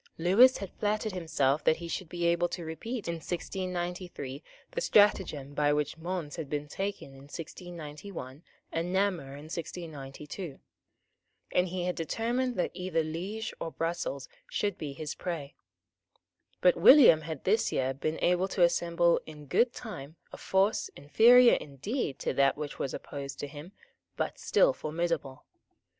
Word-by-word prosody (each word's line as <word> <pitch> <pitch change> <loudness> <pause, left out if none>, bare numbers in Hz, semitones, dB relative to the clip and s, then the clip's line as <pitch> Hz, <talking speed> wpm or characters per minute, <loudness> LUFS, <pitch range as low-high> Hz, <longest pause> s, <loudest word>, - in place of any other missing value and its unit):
Lewis 205 +10 +6
had 195 -3 -6
flattered 215 +1 0
himself 155 -6 0
that 160 - +4
he 170 +1 -7
should 170 0 -4
be 175 0 -2
able 170 +1 +2
to 175 - -5
repeat 215 +7 -5
in 170 0 -2
1693 175 -5 -4 0.3
the - - -3
stratagem 180 - +3
by 145 0 +2
which 150 0 0
Mons 170 -3 -4
had 155 -4 -5
been 150 0 -3
taken 195 +1 -4
in 135 - -14
1691 160 -3 -8 0.3
and 165 +2 -2
Namur 185 -8 0
in 145 - -10
1692; 155 -1 -7 0.9
and 180 +1 +2
he 180 0 -3
had 180 0 0
determined 240 +9 -1
that 180 - 0
either 180 -2 -1
Liege 185 +8 -4
or - - -3
Brussels 165 -5 -3 0.2
should 205 -3 -1
be 145 -3 -5
his 150 +2 -5
prey. 160 -6 -5 1.1
But - - +6
William 245 - +8
had 155 -2 -6
this 215 +4 +2
year 130 0 0
been 155 +4 -2
able 180 +1 +3
to 185 -2 +1
assemble 170 0 +3
in 150 -1 -10
good 235 - +3
time 160 - -8 0.2
a - - -7
force, 195 +2 +1
inferior 235 - +6
indeed 145 - -3
to - - -1
that 140 0 +3
which 150 -1 -6
was 135 - -2
opposed 140 -1 -7
to 145 - -3
him, 150 +5 -10 0.5
but - - -2
still - - +4
formidable. 155 - -3
170 Hz, 150 wpm, -30 LUFS, 150-190 Hz, 1.1 s, William